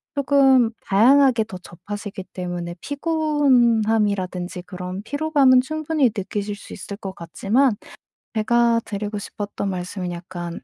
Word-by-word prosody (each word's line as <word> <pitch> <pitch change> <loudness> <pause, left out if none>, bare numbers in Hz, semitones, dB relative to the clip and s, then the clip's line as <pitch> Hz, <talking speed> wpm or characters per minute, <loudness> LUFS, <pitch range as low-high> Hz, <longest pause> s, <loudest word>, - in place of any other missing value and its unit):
쪼금 270 -4 +4
다양하게 245 +4 +5
더 210 -4 -9
접하시기 195 +3 -8
때문에 175 -1 -5
피곤함이라든지 230 - +1
그런 180 +1 -6
피로감은 285 -1 +3
충분히 310 0 0
느끼실 205 +1 -3
수 205 - -13
있을 200 +1 -7
것 195 -2 -6
같지만 205 - +1 0.6
제가 230 +1 +2
드리고 210 0 -4
싶었던 205 0 -5
말씀은 180 0 -4
약간 175 0 -6
210 Hz, 300 characters per minute, -22 LUFS, 185-260 Hz, 0.6 s, 다양하게